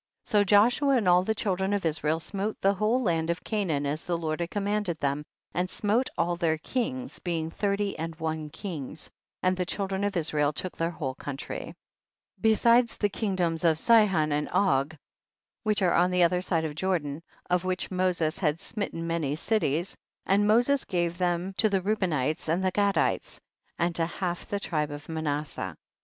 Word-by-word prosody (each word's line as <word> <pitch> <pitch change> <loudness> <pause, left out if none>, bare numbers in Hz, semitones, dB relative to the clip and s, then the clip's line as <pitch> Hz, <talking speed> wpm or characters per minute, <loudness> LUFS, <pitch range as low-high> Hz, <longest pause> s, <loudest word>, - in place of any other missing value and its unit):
So 210 -3 +3
Joshua 240 +8 +4
and 215 -6 0
all 180 0 +6
the 220 +3 0
children 190 -1 0
of 200 -3 -1
Israel 155 0 +1
smote 200 +5 -3
the 195 +1 +3
whole 215 +6 +1
land 165 -4 0
of 170 +1 -2
Canaan 175 -10 -1
as 150 +3 -2
the 175 -1 -1
Lord 155 -1 -2
had 170 0 -2
commanded 205 -3 -1
them, 140 +1 -1 0.3
and 180 +2 -1
smote 220 +7 0
all 175 +1 +1
their 165 -2 +1
kings, 255 - -3
being 165 -2 -2
thirty 200 +1 -1
and 165 0 -4
one 160 -1 -3
kings, 160 -4 -7 0.3
and 185 0 +3
the 185 - -1
child 195 0 -2
ren 190 +1 -1
of 205 -2 0
Israel 150 -2 +1
took 185 +5 -4
their 165 0 0
whole 145 -6 -4
country. 135 0 -6 0.6
52. - - -30
Besides 235 +2 +4
the 205 - +1
kingdoms 185 -6 -1
of 165 -2 +4
Sihon 190 -7 +4
and 150 +1 0
Og 160 -5 +2 0.6
which 215 -2 +1
are 175 - +3
on 175 +1 +4
the 180 -1 +3
other 180 +1 +3
side 160 -4 -1
Jordan, 160 -4 -1 0.3
of 180 0 +1
which 185 +1 -2
Moses 180 -3 0
had 155 -3 +1
smitten 200 -6 -4
many 165 -4 -1
cities, 175 -2 0 0.3
and 200 +2 +3
Moses 245 +6 +4
gave 175 -2 -1
them 180 +1 0
to 220 - +3
the 195 -1 +2
Reubenites 170 -8 0
and 175 +4 +1
the 185 - +2
Gadites 200 +1 +1 0.4
and 170 0 0
to 165 -1 +1
half 175 0 -4
the 205 - -2
tribe 155 -6 -1
of 145 0 -8
Manasseh. 150 - -3
53. - - -61
180 Hz, 185 wpm, -28 LUFS, 160-205 Hz, 0.6 s, all